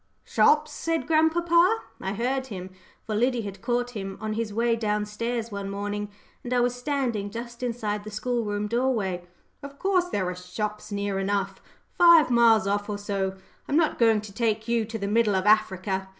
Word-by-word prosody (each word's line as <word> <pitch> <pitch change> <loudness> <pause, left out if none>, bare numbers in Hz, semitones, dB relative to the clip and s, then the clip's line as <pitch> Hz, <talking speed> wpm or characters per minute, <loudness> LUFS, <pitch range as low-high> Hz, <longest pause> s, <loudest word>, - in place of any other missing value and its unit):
"Shops," - - +3
said 330 -1 -2
grandpapa 340 +5 +3 0.2
I 190 - -2
heard 260 +5 -1
him, 190 -5 -7 0.3
for 220 - -3
Liddy 245 +3 +1
had 195 -2 -7
caught 245 +1 -1
him 195 -4 -6
on 215 +1 -3
his 225 -1 -2
way 230 +2 +1
down 210 -2 -1
stairs 230 +2 -3
one 200 -1 -4
morning, 205 +1 -3 0.3
and 245 - -6
I 250 - +3
was 245 0 +2
standing 245 -6 -2
just 235 +3 -8
inside 220 -4 -2
the 215 - -7
school 235 +3 -2
room 205 0 -2
doorway; 210 -6 -1 0.3
"of 280 0 -10
course 375 0 +2
there 190 - -1
are 180 - -3
shops 210 +4 -5
near 200 -1 -2
enough 195 0 -1 0.4
five 335 -5 +7
miles 230 -3 +5
off 205 +1 -1
or 205 - -2
so. 195 -2 -2 0.3
I'm 290 - +1
not 325 -2 +2
going 225 -3 +4
to 210 -2 -10
take 220 0 -1
you 235 -1 +1
to 225 +1 -5
the 200 -2 -3
middle 210 -1 +2
of 190 0 0
Africa. 190 -2 +2
215 Hz, 190 wpm, -26 LUFS, 205-245 Hz, 0.4 s, five